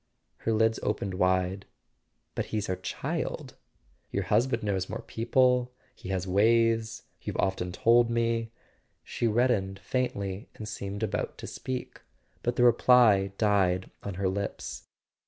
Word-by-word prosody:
Her 115 - -2
lids 110 0 +2
opened 100 -2 -2
wide. 95 +1 +1 0.7
"But - - -2
he's 105 -2 -3
our 95 - +1
child." - - -4 0.5
"Your - - -1
husband 120 -1 +1
knows 95 -3 -1
more 110 - -5
people—he 125 -1 0
has 95 -1 -1
ways, 115 +3 +2 0.2
you've - - -5
often 95 -2 0
told 115 +5 +4
me 115 -1 0 0.3
" - - -44
She 120 - -1
reddened 110 -4 +1
faintly 100 -2 -3
and 105 - -7
seemed 100 +1 -5
about 105 -1 -2
to - - -8
speak; 130 -1 -6 0.4
but 120 0 -1
the 120 - +3
reply 115 -5 +5
died 95 -4 +2
on 100 -2 -5
her 95 +1 0
lips. 100 +2 -4
105 Hz, 140 wpm, -28 LUFS, 95-115 Hz, 0.7 s, reply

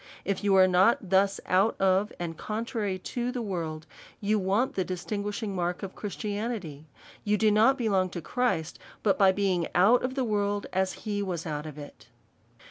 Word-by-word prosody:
If 200 0 -2
you 200 -1 +3
are 190 -1 +7
not 185 +1 +3
thus 195 +1 +3
out 195 +5 +2
of, 195 +2 +2
and 170 -2 -4
contrary 215 -1 -3
to 240 +6 -3
the 250 - -4
world, 160 -6 -4 0.3
you 210 +1 +1
want 200 +7 +1
the 190 - 0
distinguishing 200 +4 -4
mark 180 +1 -2
of 190 - -5
Christianity; 205 -7 -5 0.4
you 210 0 +1
do 215 0 +3
not 225 +6 +4
belong 195 -7 +1
to - - -2
Christ, 240 -8 -1 0.2
but 200 - +2
by 195 -1 +6
being 190 -4 0
out 210 +7 +5
of 255 +1 -3
tlie 265 -2 0
world 205 -2 0
as 190 0 +1
he 205 -1 -1
was 180 -4 -3
out 150 -1 -4
of 150 -1 -9
it. 145 -1 -11
200 Hz, 180 wpm, -28 LUFS, 185-215 Hz, 0.4 s, are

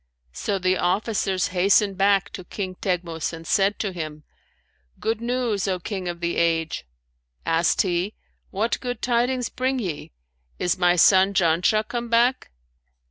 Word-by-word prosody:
So 200 - -2
the 185 0 +1
officers 190 0 0
hastened 195 +2 +3
back 195 0 +2
to 185 - -8
King 185 0 -5
Teghmus 175 -3 -2
and 165 0 -9
said 195 +4 +2
to 200 - -2
him, 155 -3 -6 0.8
'Good 225 0 -1
news, 235 -4 -1
O 185 -1 0
King 185 +1 -5
of 175 0 -5
the 170 0 -1
age!' 165 - 0 0.6
Asked 165 +1 +2
he, 185 +2 -1 0.3
'What 220 +4 -1
good 245 -3 -5
tidings 245 0 +1
bring 260 +1 -1
ye: 180 -11 -4 0.5
is 180 - +1
my 180 -1 +3
son 190 +2 +5
Janshah 180 +6 +2
come 240 -1 -4
back?' 240 +3 +2
195 Hz, 145 wpm, -24 LUFS, 175-220 Hz, 0.8 s, son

